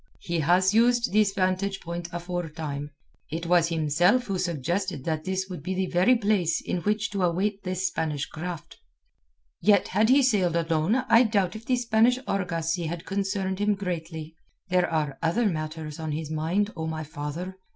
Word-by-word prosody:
He 170 Hz, -1 st, -2 dB
has 180 Hz, +5 st, +3 dB
used 240 Hz, 0 st, +3 dB
this 210 Hz, -1 st, +4 dB
vantage 195 Hz, +1 st, 0 dB
point 170 Hz, 0 st, -5 dB
afore 175 Hz, -1 st, -4 dB
time. 145 Hz, -2 st, -5 dB, 0.4 s
It 165 Hz, +3 st, -4 dB
was 170 Hz, -1 st, +3 dB
himself 170 Hz, -, +3 dB
who 195 Hz, -6 st, -3 dB
suggested 170 Hz, -1 st, -2 dB
that 155 Hz, 0 st, -2 dB
this 190 Hz, 0 st, -1 dB
would 180 Hz, -5 st, -7 dB
be 185 Hz, +6 st, -3 dB
the 190 Hz, 0 st, 0 dB
very 185 Hz, +8 st, +4 dB
place 200 Hz, -7 st, +1 dB
in -, -, -3 dB
which 210 Hz, +4 st, -1 dB
to 200 Hz, -2 st, -2 dB
await 195 Hz, +4 st, 0 dB
this 185 Hz, 0 st, -2 dB
Spanish 150 Hz, -6 st, -1 dB
craft." 170 Hz, -1 st, -7 dB, 0.8 s
"Yet 200 Hz, -2 st, +4 dB
had 215 Hz, +4 st, +2 dB
he 275 Hz, +2 st, +6 dB
sailed 195 Hz, -9 st, +2 dB
alone 165 Hz, +4 st, +1 dB
I 230 Hz, +1 st, +7 dB
doubt 205 Hz, -6 st, +1 dB
if 220 Hz, +1 st, -9 dB
the 255 Hz, -, +3 dB
Spanish 240 Hz, 0 st, +3 dB
argosy 170 Hz, -3 st, -1 dB
had 170 Hz, +1 st, -5 dB
concerned 195 Hz, -1 st, -2 dB
him 205 Hz, 0 st, +2 dB
greatly. 165 Hz, -4 st, -5 dB, 0.3 s
There 180 Hz, -1 st, +2 dB
are 150 Hz, -4 st, -1 dB
other 225 Hz, +9 st, +1 dB
matters 155 Hz, -3 st, -3 dB
on 160 Hz, -2 st, -3 dB
his 155 Hz, 0 st, -4 dB
mind, 175 Hz, +7 st, 0 dB
O 160 Hz, -2 st, -3 dB
my 160 Hz, 0 st, -3 dB
father. 160 Hz, +5 st, -6 dB
180 Hz, 175 wpm, -26 LUFS, 160-200 Hz, 0.8 s, I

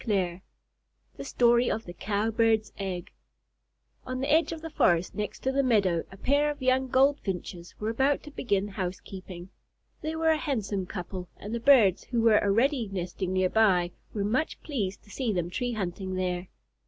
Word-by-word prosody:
THE 190 Hz, -5 st, -1 dB, 0.8 s
STORY 240 Hz, -, +3 dB
OF 225 Hz, -, -2 dB
THE 175 Hz, -, -8 dB
COW 205 Hz, +4 st, -1 dB
BIRD'S 220 Hz, -1 st, +2 dB
EGG 185 Hz, -3 st, -4 dB, 0.9 s
On 255 Hz, 0 st, -4 dB
the 275 Hz, +2 st, -1 dB
edge 325 Hz, +2 st, +3 dB
of 325 Hz, -1 st, -6 dB
the 325 Hz, -, -6 dB
forest 170 Hz, -7 st, +2 dB
next 210 Hz, -1 st, -4 dB
to 265 Hz, -, 0 dB
the 275 Hz, +1 st, +2 dB
meadow, 200 Hz, -10 st, +2 dB
a 195 Hz, -, -11 dB
pair 285 Hz, +7 st, +2 dB
of 295 Hz, -, -4 dB
young 260 Hz, 0 st, +2 dB
Goldfinches 205 Hz, -10 st, 0 dB
were 215 Hz, +1 st, -1 dB
about 270 Hz, +5 st, +1 dB
to 295 Hz, -, -10 dB
begin 205 Hz, -7 st, -1 dB
housekeeping. 185 Hz, -1 st, -6 dB, 0.5 s
They 315 Hz, -1 st, -3 dB
were 320 Hz, 0 st, +3 dB
a 315 Hz, -, +2 dB
handsome 210 Hz, -, -2 dB
couple, 180 Hz, -1 st, -6 dB
and 210 Hz, +3 st, -7 dB
the 235 Hz, -, -1 dB
birds 230 Hz, -8 st, +5 dB
who 240 Hz, -, -1 dB
were 225 Hz, -2 st, +5 dB
already 230 Hz, +3 st, +2 dB
nesting 185 Hz, 0 st, -3 dB
near 185 Hz, 0 st, +2 dB
by 185 Hz, -6 st, +3 dB, 0.2 s
were 205 Hz, -, -2 dB
much 255 Hz, +9 st, -1 dB
pleased 210 Hz, -11 st, -3 dB
to 205 Hz, -, -17 dB
see 250 Hz, -2 st, -1 dB
them 175 Hz, -3 st, -2 dB
tree 245 Hz, +4 st, -2 dB
hunting 190 Hz, -2 st, -3 dB
there. 180 Hz, -1 st, -2 dB
210 Hz, 180 wpm, -28 LUFS, 185-255 Hz, 0.9 s, birds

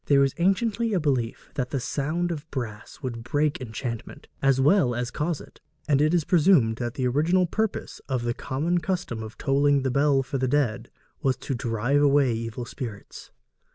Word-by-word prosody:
There 140 Hz, -1 st, +5 dB
was 135 Hz, -1 st, +2 dB
anciently 215 Hz, +5 st, +1 dB
a -, -, +3 dB
belief 130 Hz, -7 st, -1 dB
that 125 Hz, -2 st, -2 dB
the 135 Hz, -, -1 dB
sound 155 Hz, +8 st, -1 dB
of 160 Hz, -1 st, -6 dB
brass 120 Hz, 0 st, -6 dB
would 115 Hz, -3 st, -4 dB
break 145 Hz, +3 st, 0 dB
enchantment, 115 Hz, -1 st, -6 dB, 0.2 s
as 135 Hz, -1 st, +3 dB
well 140 Hz, -3 st, +4 dB
as 120 Hz, +1 st, -2 dB
cause 155 Hz, +2 st, -2 dB
it; -, -, -15 dB, 0.3 s
and 145 Hz, -2 st, +3 dB
it 155 Hz, +1 st, +3 dB
is 170 Hz, -2 st, +2 dB
presumed 150 Hz, -10 st, +4 dB
that 120 Hz, +1 st, -3 dB
the 130 Hz, -, -1 dB
original 165 Hz, +8 st, +2 dB
purpose 220 Hz, +4 st, -3 dB
of 130 Hz, -3 st, -1 dB
the 120 Hz, 0 st, 0 dB
common 160 Hz, +9 st, -1 dB
custom 170 Hz, -9 st, -3 dB
of 110 Hz, 0 st, -8 dB
tolling 140 Hz, 0 st, +2 dB
the 130 Hz, -, 0 dB
bell 140 Hz, 0 st, +3 dB
for 135 Hz, +1 st, -3 dB
the 130 Hz, -, +1 dB
dead 125 Hz, -4 st, 0 dB, 0.3 s
was 135 Hz, -4 st, +1 dB
to 135 Hz, +2 st, -4 dB
drive 120 Hz, +3 st, 0 dB
away 140 Hz, -3 st, +4 dB
evil 115 Hz, +1 st, -4 dB
spirits. 115 Hz, -5 st, -8 dB
135 Hz, 190 wpm, -26 LUFS, 120-155 Hz, 0.3 s, There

